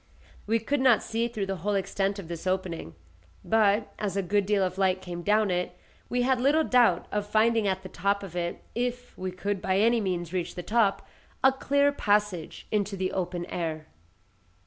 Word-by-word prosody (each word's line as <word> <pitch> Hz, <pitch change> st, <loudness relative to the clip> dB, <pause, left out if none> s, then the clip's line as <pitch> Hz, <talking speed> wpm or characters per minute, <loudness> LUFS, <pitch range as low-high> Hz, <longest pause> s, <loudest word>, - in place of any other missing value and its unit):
We 225 Hz, +2 st, +3 dB
could 275 Hz, +6 st, -1 dB
not 255 Hz, -4 st, +5 dB
see 230 Hz, +1 st, -1 dB
through 220 Hz, -4 st, -3 dB
the 195 Hz, 0 st, -3 dB
whole 200 Hz, +4 st, -1 dB
extent 195 Hz, +1 st, -1 dB
of 195 Hz, -5 st, -7 dB
this 170 Hz, +1 st, -6 dB
opening; 185 Hz, -, -2 dB, 0.5 s
but, 215 Hz, -1 st, +2 dB
as 200 Hz, -2 st, -2 dB
a 195 Hz, -, +1 dB
good 200 Hz, +2 st, +1 dB
deal 205 Hz, -2 st, +2 dB
of 185 Hz, +1 st, -2 dB
light 190 Hz, -1 st, +2 dB
came 175 Hz, -2 st, -6 dB
down 210 Hz, +1 st, +2 dB
it, 180 Hz, 0 st, -2 dB, 0.3 s
we 245 Hz, 0 st, +1 dB
had 255 Hz, -1 st, +2 dB
little 295 Hz, +5 st, +4 dB
doubt 240 Hz, -, +3 dB
of 205 Hz, 0 st, -2 dB
finding 220 Hz, 0 st, +3 dB
at 190 Hz, 0 st, -1 dB
the -, -, -6 dB
top 200 Hz, +3 st, 0 dB
of 180 Hz, -3 st, -9 dB
it 175 Hz, -1 st, -3 dB
(if 245 Hz, +1 st, -3 dB
we 185 Hz, 0 st, -4 dB
could 195 Hz, +1 st, -3 dB
by 190 Hz, 0 st, +1 dB
any 230 Hz, +3 st, +3 dB
means 175 Hz, -3 st, -2 dB
reach 180 Hz, -2 st, -2 dB
the 180 Hz, -, -5 dB
top) 215 Hz, -2 st, +1 dB, 0.4 s
a 265 Hz, -, +7 dB
clear 280 Hz, +2 st, +2 dB
passage 205 Hz, -, 0 dB
into 205 Hz, -1 st, 0 dB
the 185 Hz, 0 st, -1 dB
open 180 Hz, -1 st, -3 dB
air. 160 Hz, -3 st, -4 dB
200 Hz, 195 wpm, -27 LUFS, 185-225 Hz, 0.5 s, a